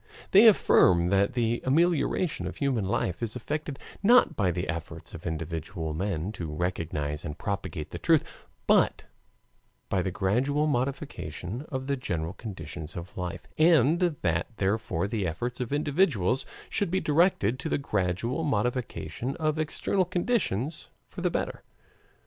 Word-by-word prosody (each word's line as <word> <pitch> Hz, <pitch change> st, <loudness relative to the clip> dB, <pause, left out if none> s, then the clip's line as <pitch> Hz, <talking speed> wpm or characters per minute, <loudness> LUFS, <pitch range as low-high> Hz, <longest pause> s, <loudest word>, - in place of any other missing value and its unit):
They 205 Hz, +4 st, +8 dB
affirm 90 Hz, -, +5 dB
that 100 Hz, +1 st, +2 dB
the 120 Hz, -1 st, 0 dB
amelioration 165 Hz, +3 st, +1 dB
of -, -, -6 dB
human 130 Hz, -8 st, 0 dB
life 95 Hz, -1 st, -1 dB
is 115 Hz, -1 st, -2 dB
effected 145 Hz, +3 st, -4 dB, 0.2 s
not 240 Hz, +5 st, +5 dB
by 100 Hz, -4 st, +2 dB
the 90 Hz, -1 st, -2 dB
efforts 80 Hz, +1 st, -6 dB
of 85 Hz, -, -7 dB
individual 80 Hz, +1 st, -4 dB
men, 90 Hz, +1 st, -2 dB
to 85 Hz, -6 st, -5 dB
recognize 75 Hz, -3 st, -2 dB
and 75 Hz, -, -5 dB
propagate 95 Hz, -7 st, -4 dB
the -, -, -5 dB
truth, -, -, +4 dB, 0.4 s
but -, -, +3 dB, 0.9 s
by 95 Hz, -, +1 dB
the 95 Hz, -, -1 dB
gradual 125 Hz, -, +1 dB
modification 130 Hz, -, -3 dB
of 130 Hz, -2 st, -3 dB
the 140 Hz, 0 st, 0 dB
general 85 Hz, -8 st, -3 dB
conditions 95 Hz, -7 st, -7 dB
of 85 Hz, +1 st, -7 dB
life, 90 Hz, -2 st, -5 dB
and 160 Hz, 0 st, +5 dB, 0.2 s
that 85 Hz, -1 st, +1 dB
therefore 95 Hz, -3 st, 0 dB
the 100 Hz, -3 st, -1 dB
efforts 120 Hz, +10 st, -3 dB
of 125 Hz, -1 st, -3 dB
individuals 145 Hz, -, +1 dB, 0.2 s
should 200 Hz, -, 0 dB
be 190 Hz, +2 st, +1 dB
directed 150 Hz, -, +2 dB
to 160 Hz, -, -3 dB
the -, -, +1 dB
gradual 110 Hz, -, -1 dB
modification 125 Hz, -1 st, -2 dB
of 155 Hz, -1 st, 0 dB
external 180 Hz, +4 st, 0 dB
conditions 175 Hz, -, -1 dB, 0.2 s
for -, -, -8 dB
the -, -, +2 dB
better. -, -, -3 dB
115 Hz, 145 wpm, -28 LUFS, 90-145 Hz, 0.9 s, They